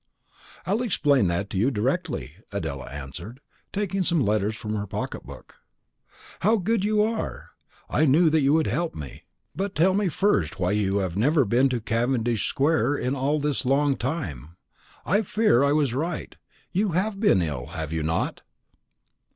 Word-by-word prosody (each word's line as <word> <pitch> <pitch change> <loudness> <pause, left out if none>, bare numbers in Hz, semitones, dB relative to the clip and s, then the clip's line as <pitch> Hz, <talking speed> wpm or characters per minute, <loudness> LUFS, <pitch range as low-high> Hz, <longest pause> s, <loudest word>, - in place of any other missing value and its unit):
"I'll 205 +5 0
explain 145 - +2
that 85 +4 -1
to - - -3
you 110 +8 +3
directly," 105 -6 -2
Adela 70 -2 -4
answered, 70 - -8 0.3
taking 195 -1 -1
some 170 -2 +2
letters 105 +1 +1
from 105 0 -5
her 105 -1 -3
pocket 105 +1 -5
book. - - -12 0.8
"How 220 +4 +3
good 210 +1 0
you 210 0 +3
are! 220 +1 -3 0.4
I 155 - +2
knew 155 +4 +4
that 160 0 +3
you 135 0 +3
would 160 -1 +3
help 165 +5 -1
me; 75 -4 -9 0.3
but 195 0 -3
tell 180 +4 +4
me 200 -1 +1
first 100 - +1
why 90 +1 +1
you 100 -1 +1
have 95 -4 -1
never 140 +5 +3
been 125 +6 +3
to 125 -2 -1
Cavendish 115 0 0
square 145 0 +1
in 125 0 -1
all 140 +3 +1
this 145 -2 -1
long 140 +2 +2
time. 85 - -4 0.5
I 200 +5 +3
fear 210 - +3
I 140 - +3
was 145 -5 +2
right; 160 +7 -3 0.4
you 195 -1 0
have 195 +3 0
been 145 - +4
ill, 70 -5 -4
have 80 -1 -5
you 80 - -1
not?" 80 +2 -1
135 Hz, 170 wpm, -25 LUFS, -, 0.8 s, knew